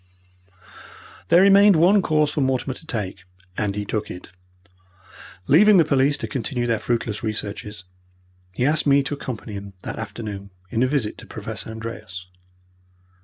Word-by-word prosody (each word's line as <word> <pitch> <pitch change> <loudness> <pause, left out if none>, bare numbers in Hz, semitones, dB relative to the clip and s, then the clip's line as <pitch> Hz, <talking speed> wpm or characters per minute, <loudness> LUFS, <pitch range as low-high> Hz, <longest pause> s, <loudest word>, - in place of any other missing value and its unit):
There 175 +3 +6
remained 200 0 +7
one 185 +6 +5
course 155 -3 +1
for 150 - -1
Mortimer 130 0 0
to 160 - -12
take, 100 - -4 0.3
and 100 -2 -1
he 105 0 -3
took 105 +1 -3
it. 90 - -9 1.1
Leaving 200 - +6
the 165 - +5
police 140 0 +2
to - - -4
continue 125 -2 -2
their 115 -2 0
fruitless 115 -3 -2
researches, 105 -3 -5 0.7
he 120 +7 -1
asked 150 +1 +2
me 140 0 +5
to 140 - -3
accompany 120 -6 -6
him 100 0 -7
that - - -6
afternoon 100 -3 -6 0.2
in 115 - 0
a 130 - +4
visit 130 -6 -1
to - - -12
Professor - - -7
Andreas. 110 -5 -7
120 Hz, 155 wpm, -22 LUFS, 105-150 Hz, 1.1 s, remained